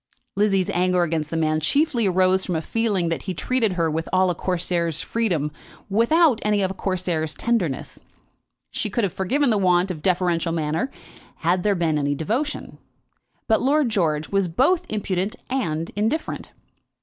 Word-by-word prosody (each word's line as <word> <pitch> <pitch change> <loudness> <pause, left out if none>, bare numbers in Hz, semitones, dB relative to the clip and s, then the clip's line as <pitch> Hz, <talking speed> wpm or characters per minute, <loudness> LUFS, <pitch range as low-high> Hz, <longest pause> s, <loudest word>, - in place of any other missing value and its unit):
Lizzie's 195 -2 +2
anger 180 0 +2
against 160 -2 -1
the 165 - -2
man 155 -1 +1
chiefly 240 - +1
arose 185 0 +3
from 180 - -2
a 160 - 0
feeling 205 -6 0
that 165 - -2
he 185 -2 -4
treated 225 +5 +1
her 170 -2 +1
with 160 +1 -2
all 185 -1 +3
a - - -1
Corsair's 170 -3 -1
freedom 175 -11 -1 0.4
without 240 - +4
any 210 -1 +2
of 190 - 0
a - - -4
Corsair's 180 -5 -2
tenderness. 200 - -1 0.7
She - - -2
could 235 - -1
have 195 - 0
forgiven 255 +8 +1
the 210 - +2
want 180 0 +3
of 160 -4 -7
deferential 175 -2 +1
manner, 160 - -1 0.5
had 175 +3 +2
there 205 +1 +2
been 160 -4 +1
any 145 0 0
devotion; 240 - -3 0.7
but 220 - +3
Lord 280 0 +2
George 160 -8 0
was 195 -2 +1
both 320 - +2
impudent 195 -1 -1 0.2
and 165 -11 -1
indifferent. 220 +10 -2
185 Hz, 165 wpm, -23 LUFS, 165-220 Hz, 0.7 s, without